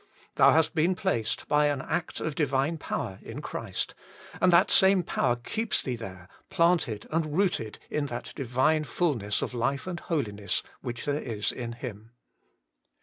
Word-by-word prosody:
Thou - - +6
hast 160 0 +3
been 175 +3 +2
placed, 115 - -1
by 150 0 +4
an 145 -2 0
act 170 - -2
of 160 - -2
Divine 145 +2 +1
Power, 95 -8 -3
in - - -7
Christ, - - -4 0.5
and 180 - +5
that 170 - +5
same 190 -1 +5
Power 120 - +1
keeps 220 - -1
thee 125 - -2
there, 95 -6 -8 0.2
planted 170 - +2
and 155 -1 0
rooted 175 - 0
in 150 -1 -1
that 120 -3 -6
Divine 135 +5 +2
fulness 125 - 0
of - - -3
life 135 +4 -1
and 180 -2 -4
holiness 105 - -1 0.2
which 120 -2 -5
there 145 0 0
is 105 -3 -1
in 120 -2 -5
Him. 115 -2 -8
140 Hz, 160 wpm, -28 LUFS, 115-165 Hz, 0.5 s, Thou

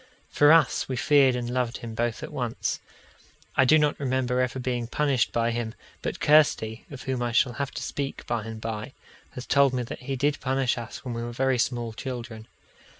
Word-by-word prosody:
For 145 +1 +6
us, 160 -5 +4
we 130 - -1
feared 135 0 +4
and 120 -1 -3
loved 125 -1 -1
him 115 -2 -7
both 115 +1 -2
at - - -7
once. - - -2 0.8
I 135 - +5
do 155 +5 +6
not 150 -1 +1
remember 130 -2 0
ever 125 +1 -1
being 125 -2 -2
punished 135 -2 +1
by 115 0 +1
him, 115 -1 -3 0.3
but - - -4
Kirsty 145 -7 +3
(of 140 -3 -9
whom 130 -2 -2
I 120 -1 -1
shall 120 +1 +3
have 140 - -1
to - - -6
speak 140 -1 -4
by 115 -2 -2
and 110 -1 -6
by) 110 +3 -5 0.4
has 125 - -7
told 140 -1 +4
me 125 - -1
that 115 - -7
he 135 +2 -4
did 145 +3 0
punish 130 -1 +1
us 120 +2 -8
when 125 - -3
we 115 - -4
were 120 0 -4
very 130 0 +1
small 120 -2 -1
children. 115 -2 -6
125 Hz, 210 wpm, -26 LUFS, 120-135 Hz, 0.8 s, For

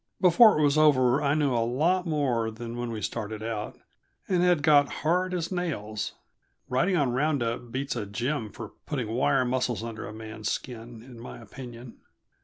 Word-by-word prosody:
Before 190 +4 +7
it 155 - +2
was 145 +1 +3
over 135 -4 +4
I 145 0 +2
knew 145 -4 +2
a 120 - +2
lot 165 +10 +1
more 130 -8 0
than 115 +1 -7
when 120 0 -3
we 110 -2 -5
started 110 -1 -4
out, 110 -2 -4 0.5
and 180 -2 +2
had 175 -4 +3
got 145 -1 +5 0.2
hard 180 +3 +2
as 175 -1 -2
nails; 120 - -3 0.5
riding 155 +9 +1
on 140 -5 +2
round 140 +1 +1
up 115 +1 -4
beats 135 +2 -2
a 110 -4 -3
gym 120 +3 -2
for 110 -1 -8 0.2
putting 125 -7 -2
wire 130 +3 +2
muscles 125 -2 -1
under 115 -1 -6
a - - -7
man's 110 0 -6
skin, 115 -2 -6
in 120 -2 -12
my 120 - -9
opinion. 120 +1 -10
125 Hz, 185 wpm, -27 LUFS, 115-150 Hz, 0.5 s, Before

